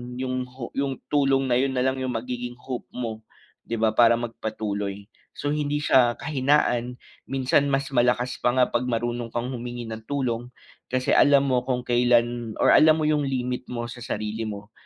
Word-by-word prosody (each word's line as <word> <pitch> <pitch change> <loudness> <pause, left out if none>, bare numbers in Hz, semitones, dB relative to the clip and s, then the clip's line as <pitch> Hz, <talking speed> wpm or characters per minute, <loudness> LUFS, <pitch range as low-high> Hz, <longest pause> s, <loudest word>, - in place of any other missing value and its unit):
’yong 130 0 -3
ho 125 -1 -8
’yong 135 -1 0 0.2
tulong 135 -2 +3
na 120 - +4
’yon 135 0 0
na 125 - +1
lang 130 0 0
’yong 130 -1 -2
magiging 125 -1 -5
hope 125 -1 -6
mo, 115 -3 -4 0.5
’di 115 - -2
ba, 110 -1 +3
para 115 0 +6
magpatuloy. 105 -4 -4 0.3
So, - - -4
hindi 150 -1 -1
siya 120 -4 +4
kahinaan, 130 -4 +1 0.3
minsan 135 +2 +1
mas 135 0 0
malakas 125 +1 +2
pa 120 - +2
nga 125 -1 +4
’pag - - 0
marunong 120 0 -2
kang 120 +1 -2
humingi 120 -1 -6
ng 110 0 -7
tulong, 125 -4 -2 0.4
kasi 130 0 0
alam 140 -1 +5
mo 125 -2 +1
kung 125 -1 -1
kailan 120 -1 +2
or - - +5
alam 155 +1 +6
mo 155 - 0
’yong 150 -1 +2
limit 125 -1 -2
mo 120 -1 -3
sa 120 +1 -9
sarili 110 -1 -3
mo 105 0 -7
125 Hz, 180 wpm, -25 LUFS, 120-130 Hz, 0.5 s, para